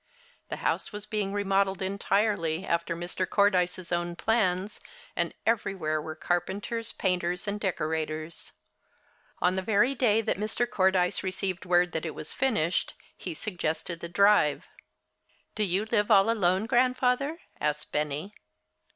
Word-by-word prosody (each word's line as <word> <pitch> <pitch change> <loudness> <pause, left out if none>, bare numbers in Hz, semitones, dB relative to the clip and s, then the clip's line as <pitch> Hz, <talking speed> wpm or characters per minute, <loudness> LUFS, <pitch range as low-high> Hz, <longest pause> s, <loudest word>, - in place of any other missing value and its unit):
The - - -2
house - - 0
was 210 -1 -7
being 210 -2 -2
remodeled 195 -1 +1
entirely, 195 -3 0
after 170 0 0
Mr. 175 +2 -3
Cordyce's 185 -3 +2
own 175 0 -1
plans, 205 -2 0 0.4
and - - 0
everywhere 180 -9 0
were 155 +1 -6
carpenters, 195 +7 -1
painters 180 0 -1
and 205 +1 -2
decorators. 155 -3 -3 0.9
On 180 +1 +3
the 190 - 0
very 220 +7 +3
day 225 -4 +3
that 205 - -1
Mr. 220 +3 -1
Cordyce 190 -4 +2
received 185 -1 -3
word 175 0 +3
that 160 +1 -3
it 155 - -6
was - - -5
finished, 210 -11 0 0.2
he 175 -4 -6
suggested 170 -3 -2
the 170 - -6
drive. 200 -5 +4 0.9
"Do 215 - 0
you 195 +2 0
live 210 -2 +1
all 205 +1 +6
alone, 190 -2 +2
Grandfather?" 255 +4 +2 0.2
asked 150 0 -2
Benny. 150 +6 -2
190 Hz, 135 wpm, -28 LUFS, 175-210 Hz, 0.9 s, all